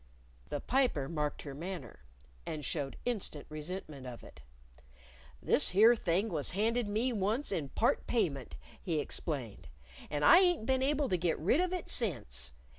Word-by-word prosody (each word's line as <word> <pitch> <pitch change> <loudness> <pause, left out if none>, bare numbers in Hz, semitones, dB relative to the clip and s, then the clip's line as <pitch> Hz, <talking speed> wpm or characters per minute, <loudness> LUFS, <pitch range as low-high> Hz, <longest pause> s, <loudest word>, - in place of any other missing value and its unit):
The 145 - -2
Piper 245 - +1
marked 150 -2 -2
her 140 - -6
manner, 165 - -7 0.4
and 150 -3 -5
showed 140 -2 -3
instant 210 -11 -2
resentment 155 -3 -6
of 120 -2 -8
it. - - -14 1.0
"This - - +2
here 220 +6 +6
thing 195 +1 0
was 155 -6 -1
handed 230 +2 +1
me 225 +5 0
once 220 +7 0
in 160 -8 -2
part 230 - +1
payment," 140 - -1 0.3
he 170 -5 -1
explained. 130 - -4 0.4
"And 145 0 0
I 345 - +9
ain't 355 - +3
been 260 +1 +2
able 285 +1 +2
to 180 - +2
get 170 -1 0
rid 195 - +2
of 365 0 0
it 365 -2 -3
since. 85 - -2
180 Hz, 160 wpm, -33 LUFS, 145-235 Hz, 1.0 s, I